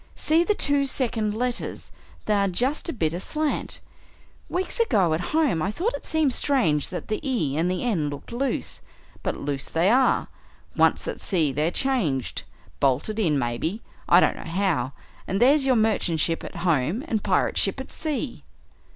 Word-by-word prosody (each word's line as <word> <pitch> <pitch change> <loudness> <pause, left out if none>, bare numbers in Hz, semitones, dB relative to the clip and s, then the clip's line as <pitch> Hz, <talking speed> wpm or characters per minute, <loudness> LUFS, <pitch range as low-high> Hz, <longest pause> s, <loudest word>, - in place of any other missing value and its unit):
"See 320 +2 +3
the 420 +4 +1
two 285 -4 +2
second 225 -6 0
letters 245 +1 -3 0.3
they 215 - +1
are 200 -1 +2
just 255 - 0
a - - +1
bit 160 - -1
aslant. 300 - -2 0.7
Weeks 370 +5 -2
ago, 205 - +3
at 160 - -1
home, 300 - +2
I 185 - 0
thought 375 - -1
it - - -6
seemed 310 -5 +2
strange 190 - +2
that 180 - -6
the 215 - -2
E 235 - -1
and 165 +3 +1
the 180 0 -2
N 180 -12 0
looked 145 +7 -8
loose. 260 +3 -2 0.4
But - - -2
loose 140 -1 -4
they 170 +5 +2
are! 260 +2 +3 0.5
Once - - +2
at - - -4
sea 165 -7 +1
they're 150 +4 0
changed 180 - -1 0.3
bolted 140 - +1
in, 160 -9 +2
maybe, 135 - -2 0.3
I - - +8
don't - - +2
know - - -7
how 170 -6 -1 0.3
and 195 - -1
there's 270 +3 +5
your 260 - +4
merchant 215 -7 +1
ship 165 +2 0
at - - -8
home 165 - +1
and 220 -8 -1
pirate - - +1
ship - - 0
at - - -7
sea!" 295 -4 -4
210 Hz, 175 wpm, -25 LUFS, 160-270 Hz, 0.7 s, I